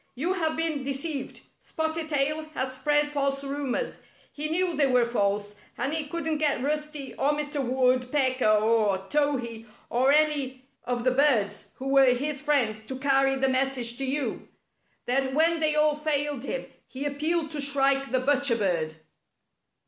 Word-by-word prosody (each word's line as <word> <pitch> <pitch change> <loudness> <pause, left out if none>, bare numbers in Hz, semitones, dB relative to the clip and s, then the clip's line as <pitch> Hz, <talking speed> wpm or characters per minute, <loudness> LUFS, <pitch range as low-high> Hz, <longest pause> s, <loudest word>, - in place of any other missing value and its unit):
"You 330 +9 0
have 320 -4 -1
been 320 -3 0
deceived. 275 +1 -4 0.2
Spotted 320 0 -3
Tail 305 +1 0
has 260 0 -2
spread 295 +2 +1
false 275 -1 -1
rumors. 280 - -3 0.3
He 305 +1 -2
knew 350 +1 +1
they 285 -1 +3
were 250 -2 +3
false, 205 -3 -1 0.2
and 265 +5 -1
he 315 -2 -1
couldn't 320 -1 -2
get 290 -5 +1
Rusty 300 -1 -3
or 290 +2 +2
Mr. 295 -1 -2
Wood 255 0 +1
pecker 260 -4 +1
or 215 -1 +3
Towhee 250 -6 -1 0.2
or 255 +3 +3
any 285 -4 +1 0.2
of 245 -1 -2
the 255 - +3
birds, 255 -6 +1
who 265 - -6
were 270 -2 +5
his 285 +2 -3
friends, 255 -8 +1
to 260 - -5
carry 270 0 +2
the 270 0 +1
message 260 -2 0
to - - -2
you. 275 +2 -2 0.6
Then 265 +1 0
when 330 +2 +3
they 310 -1 +2
all 300 0 +3
failed 290 -3 -1
him - - -3 0.2
he 265 +2 -6
appealed 310 +3 0
to 300 -2 -3
Shrike 275 -1 +1
the 255 -1 +1
Butcher 280 -2 +2
Bird." 170 -7 -1
275 Hz, 165 wpm, -26 LUFS, 255-300 Hz, 0.6 s, were